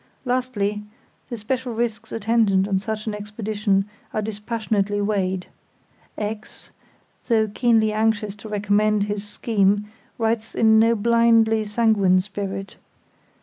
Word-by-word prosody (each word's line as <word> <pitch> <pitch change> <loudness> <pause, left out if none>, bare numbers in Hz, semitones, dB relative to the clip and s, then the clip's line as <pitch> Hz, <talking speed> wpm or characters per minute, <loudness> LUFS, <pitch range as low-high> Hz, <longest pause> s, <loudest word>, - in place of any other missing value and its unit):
Lastly, 245 -5 -1 0.5
the 240 - -4
special 245 +2 -3
risks 230 -1 -3
attendant 215 -3 +2
on 195 -2 +1
such 215 +1 -4
an 215 - -2
expedition 210 -1 -1 0.3
are 215 - +1
dispassionately 210 -1 -2
weighed. 190 -3 -1 0.7
X——, 210 0 -6 0.6
though 220 -2 +3
keenly 220 0 +2
anxious 215 -1 0
to 215 +2 -10
recommend 210 0 +2
his 205 0 -3
scheme, 205 -1 0 0.3
writes 225 -1 -1
in 220 -1 +5
no 230 +1 +4
blindly 230 0 +3
sanguine 210 -4 +3
spirit. 195 0 -5
215 Hz, 115 wpm, -23 LUFS, 205-225 Hz, 0.7 s, in